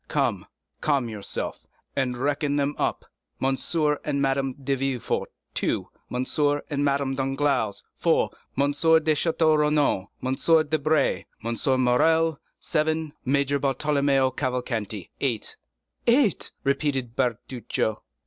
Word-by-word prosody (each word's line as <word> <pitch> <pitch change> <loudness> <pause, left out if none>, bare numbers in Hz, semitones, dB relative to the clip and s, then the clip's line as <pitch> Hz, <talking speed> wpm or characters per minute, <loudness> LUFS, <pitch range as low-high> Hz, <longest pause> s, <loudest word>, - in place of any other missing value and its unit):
Come, - - 0 0.3
calm 140 -6 +1
yourself, 105 -3 -5 0.3
and 125 -2 0
reckon 145 +2 0
them 145 0 +1
up—M. 135 0 -2 0.5
and 145 -2 -1
Madame 135 -1 +1
de 140 0 -2
Villefort, 135 -2 -1 0.3
two; - - -1 0.2
M. 125 +1 -1 0.5
and 145 0 0
Madame 140 -1 +1
Danglars, 135 -5 0
four; - - +2 0.3
M. 140 +1 +3
de 160 +1 +4
Château 160 0 +2
Renaud, 150 -10 +2 0.2
M. 155 +5 +3
Debray, 155 0 +1 0.2
M. 130 +3 +1
Morrel, 160 +5 +3 0.2
seven; 155 -1 0
Major 140 +1 +2
Bartolomeo 140 -1 +2
Cavalcanti, 120 - -3
eight." 120 -6 -1 0.5
"Eight!" 235 - +3
repeated 135 -4 0
Bertuccio. 120 -3 -1
140 Hz, 110 wpm, -25 LUFS, 130-150 Hz, 0.5 s, de